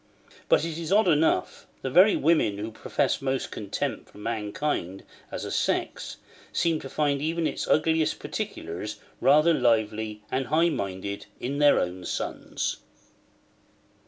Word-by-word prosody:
But -, -, +4 dB
it 165 Hz, -1 st, -4 dB
is 165 Hz, +1 st, -4 dB
odd 210 Hz, 0 st, +5 dB
enough; 155 Hz, -, +2 dB, 0.2 s
the 130 Hz, -, -2 dB
very 185 Hz, +8 st, +7 dB
women 155 Hz, -10 st, +2 dB
who 110 Hz, +2 st, -4 dB
profess -, -, -1 dB
most 135 Hz, -1 st, -1 dB
contempt 100 Hz, -3 st, -4 dB
for -, -, -17 dB
mankind 105 Hz, -, -3 dB, 0.3 s
as -, -, -4 dB
a -, -, -5 dB
sex, -, -, -1 dB, 0.3 s
seem 165 Hz, -2 st, +1 dB
to 135 Hz, -, -8 dB
find 140 Hz, -1 st, 0 dB
even 165 Hz, +2 st, 0 dB
its -, -, -2 dB
ugliest 160 Hz, 0 st, +2 dB
particulars 95 Hz, +6 st, -5 dB, 0.2 s
rather 155 Hz, +4 st, +5 dB
lively 110 Hz, -5 st, +1 dB
and 130 Hz, -1 st, -1 dB
high 165 Hz, +3 st, +3 dB
minded 100 Hz, -, -4 dB
in 140 Hz, +4 st, -3 dB
their 145 Hz, -1 st, +6 dB
own 90 Hz, +1 st, -3 dB
sons. -, -, -3 dB
135 Hz, 140 wpm, -27 LUFS, 105-160 Hz, 0.3 s, very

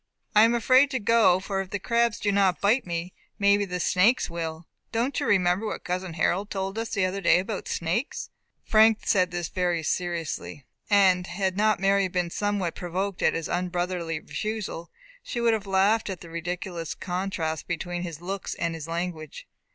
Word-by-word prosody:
"I 215 Hz, +1 st, +8 dB
am 235 Hz, +1 st, +2 dB
afraid 255 Hz, +4 st, +5 dB
to 260 Hz, -2 st, -1 dB
go, 220 Hz, -4 st, +4 dB
for 195 Hz, 0 st, -2 dB
if 190 Hz, -, -7 dB
the 205 Hz, -, -2 dB
crabs 235 Hz, +2 st, +1 dB
do 205 Hz, -, +1 dB
not 195 Hz, -2 st, +2 dB
bite 215 Hz, +3 st, +2 dB
me 170 Hz, +1 st, -4 dB, 0.2 s
maybe 200 Hz, 0 st, +3 dB
the 180 Hz, -1 st, -4 dB
snakes 195 Hz, +6 st, +3 dB
will. 165 Hz, -1 st, -5 dB, 0.3 s
Don't 240 Hz, +5 st, 0 dB
you -, -, -2 dB
remember 185 Hz, +2 st, +2 dB
what -, -, -5 dB
cousin 180 Hz, -1 st, -3 dB
Harold 185 Hz, +5 st, 0 dB
told 195 Hz, +2 st, -3 dB
us 225 Hz, -, -3 dB
the 195 Hz, -, +1 dB
other 190 Hz, +2 st, -2 dB
day -, -, +5 dB
about 195 Hz, +2 st, -3 dB
snakes." 175 Hz, -, -2 dB, 0.3 s
Frank 220 Hz, 0 st, +5 dB
said 185 Hz, -3 st, +2 dB
this 175 Hz, -1 st, -3 dB
very 175 Hz, -3 st, 0 dB
seriously, 165 Hz, -5 st, -3 dB, 0.2 s
and 190 Hz, -3 st, +4 dB
had 190 Hz, +1 st, -1 dB
not 215 Hz, +1 st, +2 dB
Mary 195 Hz, 0 st, +3 dB
been 180 Hz, -1 st, -2 dB
somewhat 205 Hz, -4 st, -1 dB
provoked 185 Hz, +2 st, -3 dB
at -, -, +3 dB
his 165 Hz, -1 st, -3 dB
unbrotherly 175 Hz, -2 st, -2 dB
refusal, 210 Hz, -4 st, -5 dB, 0.3 s
she 240 Hz, -, -5 dB
would 235 Hz, -1 st, +3 dB
have 210 Hz, -2 st, -2 dB
laughed 200 Hz, +3 st, +2 dB
at 190 Hz, -3 st, -5 dB
the 170 Hz, -, -11 dB
ridiculous 170 Hz, 0 st, -4 dB
contrast 180 Hz, -4 st, -3 dB
between 175 Hz, 0 st, -3 dB
his 170 Hz, -3 st, -6 dB
looks 190 Hz, +1 st, -4 dB
and 170 Hz, -1 st, -2 dB
his 165 Hz, -2 st, -7 dB
language. 165 Hz, -2 st, -5 dB
185 Hz, 180 wpm, -26 LUFS, 175-205 Hz, 0.3 s, I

